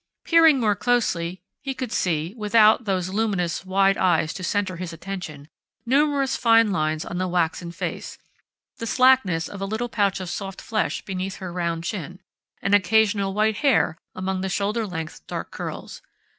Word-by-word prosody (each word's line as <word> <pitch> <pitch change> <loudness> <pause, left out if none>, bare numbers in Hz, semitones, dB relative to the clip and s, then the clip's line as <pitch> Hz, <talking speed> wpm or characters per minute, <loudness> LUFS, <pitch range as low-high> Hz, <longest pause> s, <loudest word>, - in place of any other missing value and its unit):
Peering 325 -4 +5
more 210 -4 +2
closely, 185 -7 0 0.2
he 270 -2 -4
could 255 -3 -5
see 165 0 -1
without 220 +1 +4
those 185 -3 -1
luminous, 190 -5 -1
wide 195 +1 +3
eyes 165 -4 +2
to 185 - -7
center 190 -1 -1
his 180 -1 -5
attention 165 -5 -7 0.4
numerous 275 +1 +2
fine 230 -2 +4
lines 155 -3 -1
on 175 - -4
the 185 - 0
waxen 175 -1 -1
face, 170 - -5 0.6
the 230 - -4
slackness 255 -10 +3
of 200 - -9
a - - -1
little 220 +4 -3
pouch 200 -4 +1
of 185 - -5
soft 195 -1 -5
flesh 220 -1 -2
beneath 190 0 -4
her 185 -3 -7
round 170 -2 -2
chin, 180 -1 -5 0.4
an 200 - +1
occasional 200 0 +3
white 215 0 +2
hair 275 - +2 0.2
among 185 0 -2
the 190 - -2
shoulder 210 +4 -1
length 160 -4 -7
dark - - -5
curls.... - - -7
195 Hz, 165 wpm, -24 LUFS, 180-220 Hz, 0.6 s, Peering